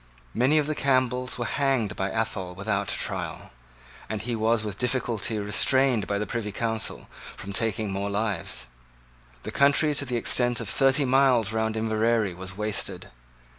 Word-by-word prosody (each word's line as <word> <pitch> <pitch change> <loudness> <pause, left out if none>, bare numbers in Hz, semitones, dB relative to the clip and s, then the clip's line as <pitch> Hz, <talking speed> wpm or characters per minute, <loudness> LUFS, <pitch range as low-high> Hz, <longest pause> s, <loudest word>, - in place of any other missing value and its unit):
Many 130 +6 +3
of 150 - +3
the 155 - -1
Campbells 130 -3 +1
were 120 - -2
hanged 135 -6 0
by 95 +1 -1
Athol 100 -5 -3
without 100 +1 -1
a - - 0
trial; - - -4 0.6
and 110 - -2
he 120 0 -2
was 110 0 +1
with 105 -2 -5
difficulty 120 -3 -1
restrained 110 +3 +2
by 100 - 0
the 105 - -2
Privy 110 -2 -3
Council 110 +1 -3 0.3
from 100 0 -7
taking 110 0 0
more 100 +1 -2
lives. 100 - -2 0.8
The - - -5
country 145 +2 +4
to 140 0 -1
the 125 -2 -1
extent 120 +1 +2
of 115 - -4
thirty 135 +6 +3
miles 125 -4 +3
round 110 0 0
Inverary 110 -2 +1
was 95 +2 -8
wasted. 105 - -2
110 Hz, 165 wpm, -26 LUFS, 105-125 Hz, 0.8 s, country